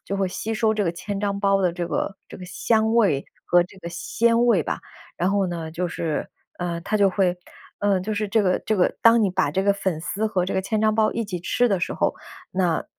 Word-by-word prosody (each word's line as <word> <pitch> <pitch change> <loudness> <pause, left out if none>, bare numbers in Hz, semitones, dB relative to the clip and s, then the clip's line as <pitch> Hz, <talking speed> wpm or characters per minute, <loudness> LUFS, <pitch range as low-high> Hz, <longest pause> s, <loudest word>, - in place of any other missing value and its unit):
就 200 - -3
会 195 -1 +1
吸 215 +4 -4
收 220 0 +1
这 210 - 0
个 175 - +1
千 190 +4 -5
张 200 -1 -1
包 195 -1 +2
的 180 - +2
这 175 0 -3
个 195 +3 -2
这 - - -9
个 185 - -9
香 220 +4 +1
味 200 -12 +3 0.2
和 175 0 +4
这 185 +2 -13
个 170 -2 -7
鲜 230 +7 +1
味 200 -10 +3
吧。 - - -3 0.4
然 180 +2 +1
后 200 -1 +1
呢， 165 -2 -4
就 175 +3 -2
是， 165 -2 -3 0.3
呃， 175 -1 -2
它 215 - 0
就 200 -1 +4
会 185 -2 +1 0.4
呃， 200 -2 +2
就 215 +4 -3
是 210 +1 -1
这 220 +2 +2
个 185 -2 +2
这 215 - +1
个 180 - +3
当 230 0 +6
你 200 - +2
把 175 - +1
这 190 +6 0
个 200 - +4
粉 190 -4 -2
丝 205 +6 -2
和 190 -5 0
这 185 - -3
个 - - +1
千 215 +3 -2
张 215 0 +3
包 215 -1 +3
一 230 - -2
起 190 -4 -4
吃 245 +7 +1
的 195 -4 +1
时 - - -2
候， - - +1 0.4
那 180 -3 0
195 Hz, 270 characters per minute, -23 LUFS, 180-215 Hz, 0.4 s, 当